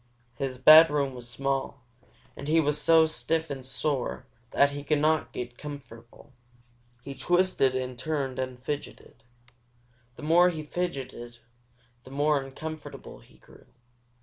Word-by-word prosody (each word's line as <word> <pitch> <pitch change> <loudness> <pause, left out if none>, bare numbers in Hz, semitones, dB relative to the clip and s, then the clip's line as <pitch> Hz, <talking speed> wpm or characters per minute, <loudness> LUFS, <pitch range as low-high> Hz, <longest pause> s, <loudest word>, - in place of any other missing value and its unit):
His 135 -2 -4
bedroom 150 0 +7
was 120 -1 -8
small, 135 +1 -3 0.5
and 140 - -8
he 160 +2 +3
was 150 -1 +1
so 160 +1 +6
stiff 160 0 -2
and 135 -2 -6
sore 130 0 -3 0.2
that 140 0 +3
he 145 0 -6
could 150 +1 +1
not 155 +1 +1
get 120 0 -7
comfortable. 135 -3 -11 0.7
He 140 - -7
twisted 175 -3 +1
and 130 -1 -4
turned 135 -3 -3
and 130 -1 -4
fidgeted. 135 -3 -7 0.9
The - - -12
more 175 +3 +5
he 160 -3 -5
fidgeted, 135 -8 -5 0.7
the - - -14
more 145 +1 +1
uncomfortable 155 +3 -9
he - - -21
grew. - - -20
140 Hz, 135 wpm, -27 LUFS, 130-155 Hz, 0.9 s, bedroom